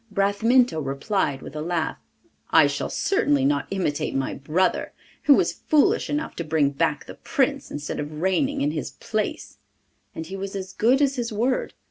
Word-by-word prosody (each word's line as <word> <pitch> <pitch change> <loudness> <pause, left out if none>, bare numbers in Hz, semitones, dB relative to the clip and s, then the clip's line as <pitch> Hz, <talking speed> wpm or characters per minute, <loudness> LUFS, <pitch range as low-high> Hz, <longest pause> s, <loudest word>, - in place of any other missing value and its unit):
Bramintho 205 +1 +3
replied 140 +2 -1
with 150 - -9
a 150 - -3
laugh: 165 0 -2 0.5
'I - - +6
shall - - -2
certainly 145 - +1
not 140 0 +1
imitate 180 -9 -1
my 135 -1 -1
brother, 160 +7 0 0.3
who 285 - +8
was - - +1
foolish 300 -2 +3
enough 295 +2 -2
to 170 - -2
bring 155 -3 +1
back 140 - -1
the - - -9
Prince - - -1
instead 145 0 -5
of 150 +1 -5
reigning 270 - +1
in 290 +1 +1
his - - -4
place,' - - -4 0.6
and 160 - -5
he 190 +4 -7
was 195 +1 -5
as 190 -1 -5
good 255 +8 +3
as 275 -1 +1
his 235 -1 -2
word. 240 +5 -1
190 Hz, 175 wpm, -24 LUFS, 150-245 Hz, 0.6 s, who